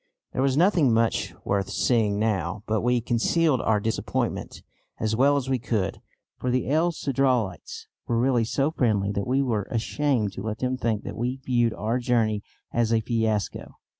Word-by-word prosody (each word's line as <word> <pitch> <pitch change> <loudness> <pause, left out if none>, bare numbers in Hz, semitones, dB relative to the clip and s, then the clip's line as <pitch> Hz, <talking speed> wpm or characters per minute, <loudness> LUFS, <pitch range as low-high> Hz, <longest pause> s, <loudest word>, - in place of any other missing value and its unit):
There - - -1
was 135 0 +2
nothing 170 - +4
much 115 0 +1
worth 100 -1 0
seeing 110 -5 +1
now, 105 -2 -1
but 110 -1 0
we 125 0 +2
concealed 125 +5 +2
our 110 -1 +2
disappointment 110 +2 -3 0.4
as 110 0 0
well 140 +4 +4
as 135 -2 -2
we 130 -1 0
could, 105 -6 -2 0.4
for 125 - -2
the 125 -2 0
El 165 +3 +3
Cedralites 130 - -1 0.2
were 120 - +1
really 120 -1 +2
so 135 +6 0
friendly 105 -9 +1
that 100 -1 -2
we 135 +2 +2
were 110 -6 -1
ashamed 120 -2 0
to 95 - -6
let 110 +1 -3
them 130 +2 -1
think 115 -5 -1
that - - -6
we 125 +2 -2
viewed 120 -3 +2
our 115 +4 -1
journey 115 -4 +1 0.3
as 115 -1 +1
a 115 - +4
fiasco. 110 -2 -2
115 Hz, 175 wpm, -25 LUFS, 110-130 Hz, 0.4 s, nothing